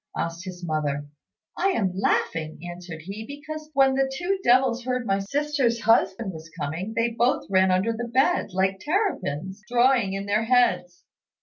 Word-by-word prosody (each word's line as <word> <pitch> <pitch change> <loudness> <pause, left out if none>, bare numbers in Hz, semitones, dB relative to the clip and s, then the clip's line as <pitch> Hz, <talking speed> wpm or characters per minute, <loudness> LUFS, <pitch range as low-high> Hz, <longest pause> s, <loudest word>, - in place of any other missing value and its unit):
asked 170 +2 -3
his 180 -1 -7
mother. 145 -3 -1 0.5
"I - - +1
am 195 - 0
laughing," 165 -4 0
answered 175 -2 -8
he, 200 +5 -6
"because 305 +4 -8
when 270 -1 +5
the 270 0 +1
two 355 +8 -1
devils 250 0 +3
heard 250 0 -2
my 195 -2 +1
sister's 270 +1 0
husband 225 -2 +2
was 160 0 -10
coming, 165 +9 -3
they 230 +1 +2
both 240 +4 +1
ran 190 0 +4
under 185 +5 +2
the 235 +1 -4
bed, 265 +9 +2
like 190 +1 0
terrapins, 205 - -2
drawing 240 -4 +3
in 195 0 -3
their 210 +2 +1
heads." 225 -8 +2
220 Hz, 165 wpm, -25 LUFS, 185-260 Hz, 0.5 s, when